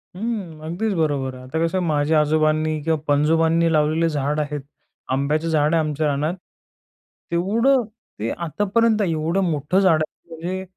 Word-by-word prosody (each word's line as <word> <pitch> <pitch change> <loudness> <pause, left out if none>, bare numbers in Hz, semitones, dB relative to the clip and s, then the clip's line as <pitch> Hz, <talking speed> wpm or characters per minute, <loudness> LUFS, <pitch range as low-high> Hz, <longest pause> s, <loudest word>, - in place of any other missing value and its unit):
हं. 195 -6 -4
अगदीच 190 +7 -2
बरोबर 140 -5 0
आहे. 130 - -11
आता 130 +5 -4
कसं 165 +3 -1
आहे, 185 - 0
माझ्या 155 0 +2
आजोबांनी 155 +1 +1
किंवा 160 0 +1
पणजोबांनी 165 +3 +3
लावलेले 155 +2 +2
झाड 150 0 -1
आहेत. 150 -1 -3 0.5
आंब्याचं 150 +4 0
झाड 155 0 +2
आहे 165 - +4
आमच्या 150 0 -1
रानात 150 +4 -1 1.0
तेवढं, 230 +9 +2 0.4
ते 110 - -2
आतापर्यंत 205 +6 +1
एवढं 165 +4 0
मोठं 150 +5 +1
झाड 165 -5 +4
आहे - - -39
म्हणजे 180 +4 -4
160 Hz, 150 wpm, -22 LUFS, 150-175 Hz, 1.0 s, आहे